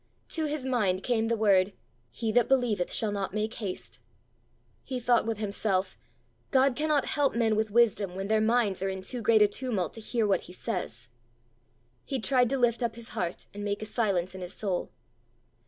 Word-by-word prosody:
To 320 -1 -1
his 295 -3 -3
mind 205 -8 +1
came 225 -2 +1
the 230 0 +1
word, 200 -2 +3 0.4
"He 220 - -3
that 240 +1 +3
believeth 240 -9 +2
shall 215 -2 0
not 200 -1 -3
make 215 +1 -1
haste." 200 -6 -6 0.8
He 255 -2 -4
thought 240 -1 +2
with 225 -2 -1
himself, 200 -2 -1 0.5
"God 265 -1 +3
cannot 300 -1 +1
help 285 -4 +1
men 225 -2 +2
with 215 0 0
wisdom 210 -4 +2
when 195 +1 -3
their 215 0 +2
minds 220 -4 +2
are 195 - 0
in 190 0 -5
too 245 +5 -3
great 220 -1 +5
a - - +5
tumult 205 -6 -2
to 225 - -8
hear 225 0 0
what 195 -3 +2
he 180 - -12
says!" 120 - -4 0.9
He 270 - -2
tried 250 +1 +3
to 270 - 0
lift 240 -1 +2
up 235 -2 -1
his 235 -1 -8
heart 175 -1 -3
and 205 0 -6
make 205 +1 -2
a - - -3
silence 195 -6 0
in 190 - -8
his 180 +1 -7
soul. 190 -5 -2
220 Hz, 195 wpm, -28 LUFS, 195-240 Hz, 0.9 s, great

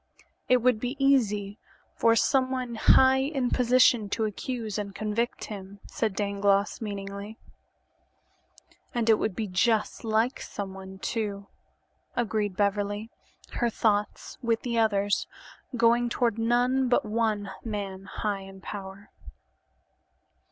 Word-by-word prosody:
"It 250 -2 +4
would 250 -3 +3
be 245 +4 -3
easy 215 -7 +2 0.4
for 230 0 +4
someone 255 -1 +1
high 260 +3 +5
in 270 -2 -1
position 245 -3 +4
to 220 +2 0
accuse 220 0 -4
and 200 -1 -5
convict 215 +3 -2
him," 200 -1 -8
said 215 -4 -2
Dangloss 200 0 +1
meaningly. 200 0 -6 1.6
"And 230 -1 +3
it 215 - +4
would 210 - -1
be 220 - -2
just 210 +3 +1
like 225 +3 +1
someone, 190 -1 -7
too," 200 -1 -3 0.7
agreed 215 -5 -1
Beverly, 205 +2 -1 0.4
her 240 - 0
thoughts, 210 -2 -1
with 230 -2 0
the 235 -2 0
others', 205 -2 +1 0.5
going 235 +1 +3
toward 235 -2 0
none 245 +3 +2
but 245 - +2
one 215 -2 -1
man 200 -4 -5
"high 205 -2 -3
in 195 0 -11
power." 195 0 -8
215 Hz, 120 wpm, -27 LUFS, 200-240 Hz, 1.6 s, high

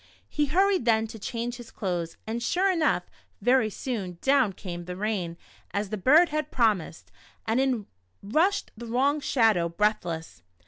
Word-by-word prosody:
He 295 -1 0
hurried 375 0 +2
then 220 -2 +3
to 225 - -9
change 235 +3 -4
his 240 -2 -11
clothes, 175 -4 -3
and 230 +2 -3
sure 370 - +2
enough, 330 -4 +1 0.4
very 245 -3 +3
soon, 200 -6 -4
down 270 -7 +3
came 175 -2 -7
the 180 0 -6
rain 190 -4 -2 0.4
as 200 0 -1
the - - 0
bird 300 - +5
had 305 -1 -2
promised, 210 -9 0 0.3
and 225 +3 +1
in 255 -6 0 0.4
rushed 330 - +1
the 235 +1 -8
wrong 270 +6 +2
Shadow, 220 -11 +2
breathless. 170 -3 -1
225 Hz, 155 wpm, -27 LUFS, 195-270 Hz, 0.4 s, bird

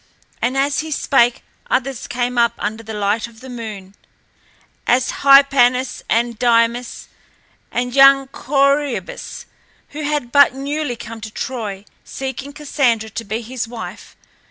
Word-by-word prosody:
And 255 +3 0
as 280 +1 +1
he 315 - -3
spake 245 -5 +2 0.3
others 270 - -1
came 245 0 -2
up 235 -1 +3
under 220 +2 -3
the 220 -1 -7
light 210 +2 0
of 230 -1 -17
the 260 +1 -10
moon, 210 -5 -8 0.9
as 245 +1 +2
Hypanis 270 -2 +5
and 230 0 0
Dymas 235 0 +1 0.7
and 245 0 -2
young 275 0 +6
Corœbus, 275 -6 -1 0.4
who 300 - -7
had 295 -5 -2
but 285 -1 +6
newly 280 -1 -3
come 230 -1 -9
to 225 - -6
Troy, 210 -4 -5 0.2
seeking 265 +1 -6
Cassandra 260 -7 0
to 230 - -5
be 220 +2 -4
his 240 0 -5
wife. 230 -1 -9
245 Hz, 135 wpm, -19 LUFS, 230-275 Hz, 0.9 s, young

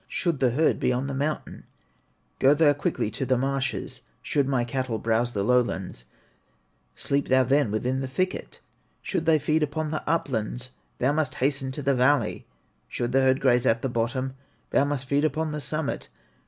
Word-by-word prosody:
Should 170 -6 -1
the 130 - +3
herd 150 +7 +2
be - - +1
on 125 +2 -1
the 140 - -3
mountain, 145 +3 -3 0.7
Go 135 +2 +5
thou 150 -1 +5
quickly 140 -6 -2
to 115 - -3
the 130 -1 +2
marshes; 135 +1 -2 0.2
Should 140 -2 +1
my 130 -3 +1
cattle 125 -1 -2
browse 115 +2 0
the 100 - -1
lowlands, 105 - 0 0.9
Sleep 140 0 -1
thou 130 0 +4
then 135 -1 +2
within 125 +5 -1
the 135 - -3
thicket; 185 +8 -3 0.4
Should 165 -4 -2
they 160 -1 +6
feed 155 +2 +1
upon 150 +1 -1
the 155 - -2
uplands, 125 -5 -1 0.3
Thou 130 +3 +2
must 150 -3 -1
hasten 135 0 0
to 145 - -5
the 140 - +3
valley; 135 +3 +1 0.4
Should 120 0 -3
the 135 +1 +3
herd 130 0 +3
graze 125 -2 +3
at 115 +1 +2
the 135 - 0
bottom, 125 +3 -1 0.4
Thou 140 - +3
must 140 -2 -2
feed 140 +2 +1
upon 155 0 0
the 150 0 -4
summit. 155 +3 -3
135 Hz, 180 wpm, -26 LUFS, 125-145 Hz, 0.9 s, they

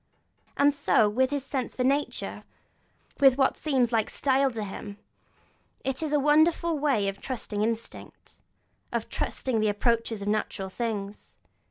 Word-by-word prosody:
And 285 +1 +4
so 280 -6 +3
with 255 +5 +1
his 285 -1 -3
sense 265 -3 -3
for 250 - -1
nature, 280 +3 -1 0.8
with 270 -2 +7
that 270 -1 +4
which - - -23
seems 260 -6 +1
like 225 -2 +1
style 270 0 +2
in 225 -4 -4
him; 200 0 -7 0.9
it 265 +1 -2
is 310 -2 -2
a 295 - +3
wonderful 315 +3 +3
way 265 -9 +1
of 195 0 -4
trusting 225 -5 -4
instinct, 230 +1 -5 0.5
of - - -3
trusting 250 -4 -2
the 215 0 +2
approaches 225 0 0
of - - -6
natural 205 -2 -2
things. 210 -2 -5
250 Hz, 155 wpm, -27 LUFS, 215-280 Hz, 0.9 s, with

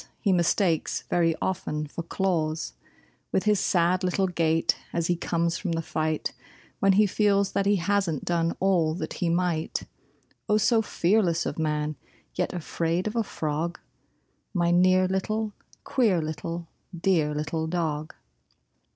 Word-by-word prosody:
he 200 -4 +2
mistakes 175 -1 +1
very 165 -2 +3
often 155 -5 -2
for 150 +3 -6
claws; 165 - -1 0.6
With 190 - +1
his 210 -2 +3
sad 180 +1 +2
little 185 +1 +1
gait 165 -3 +1 0.2
as 170 -1 -1
he 175 - +2
comes 170 0 -1
from 180 -4 -2
the 165 - -1
fight 155 -1 -2 0.5
When 195 0 +4
he 210 +2 +5
feels 200 0 +2
that 200 - 0
he 205 - +4
hasn't 190 -4 0
done 170 -1 0
all 175 -5 +2
that 180 - -4
he 175 - +2
might; 170 -2 0 0.7
Oh, 210 - +4
so 225 +2 +3
fearless 175 -4 +1
of - - -3
man, 150 -1 -1 0.4
yet 180 - -1
afraid 170 0 -1
of 215 +2 -3
a 230 - +3
frog, 160 -1 -3 0.8
My 170 -1 +2
near 185 +1 +4
little, 210 +3 -1 0.3
queer 220 -9 +2
little, 165 +2 -4 0.3
dear 160 -5 +2
little 155 +2 -2
dog! 160 -3 -2
175 Hz, 145 wpm, -26 LUFS, 160-190 Hz, 0.8 s, he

